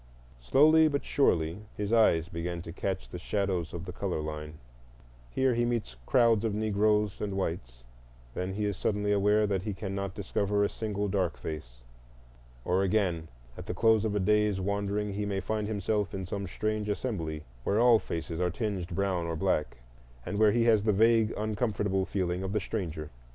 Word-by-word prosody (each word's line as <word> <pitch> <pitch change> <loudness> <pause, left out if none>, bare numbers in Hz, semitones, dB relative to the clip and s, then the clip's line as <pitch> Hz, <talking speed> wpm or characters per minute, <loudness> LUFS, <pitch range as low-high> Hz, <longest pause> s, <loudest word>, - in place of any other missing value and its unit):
Slowly 155 - +5
but 145 -2 -1
surely 85 - +1 0.2
his 105 +2 -2
eyes 85 -8 +4
begin 85 0 -4
to 80 - -7
catch 95 0 -3
the 90 - -7
shadows 95 -3 -1
of 85 0 -6
the 90 - -5
color 90 -2 -3
line: 75 0 -5 0.7
here 130 - +2
he 120 0 +1
meets 120 - -2
crowds 115 -4 +4
of 110 -2 0
Negroes 105 -1 +1
and 100 -2 -2
whites; - - -4 0.5
then 95 +1 -3
he 105 0 -1
is 100 -1 -1
suddenly 105 +2 0
aware 105 +1 +3
that 100 -3 0
he 100 0 -4
cannot 100 0 -4
discover 100 0 0
a 100 - +2
single 105 -2 -3
dark 95 -4 0
face; - - -7 0.8
or 90 +2 +2
again 95 -5 +1 0.3
at - - -9
the 90 - -3
close 110 +1 +4
of 105 -2 -1
a - - +2
day's 105 0 +2
wandering 100 +1 -1
he 105 +1 -2
may 100 -1 -1
find 105 +2 -2
himself 105 -1 -1
in 95 -1 -4
some 100 +2 -4
strange 110 +3 -2
assembly, 85 -9 -3 0.2
where 100 - +1
all 120 -1 +6
faces 85 -2 -5
are 90 0 +1
tinged 95 -2 -3
brown 90 -1 -1
or 85 - -2
black, 80 -6 0 0.5
and 100 - -3
where 110 -1 +6
he 120 +2 +2
has 110 -3 +4
the 105 -1 +2
vague, 115 +1 +4
uncomfortable 105 -3 0
feeling 90 -2 -1
of 95 +1 -3
the 105 - +2
stranger. 85 -8 -4
100 Hz, 185 wpm, -29 LUFS, 90-105 Hz, 0.8 s, all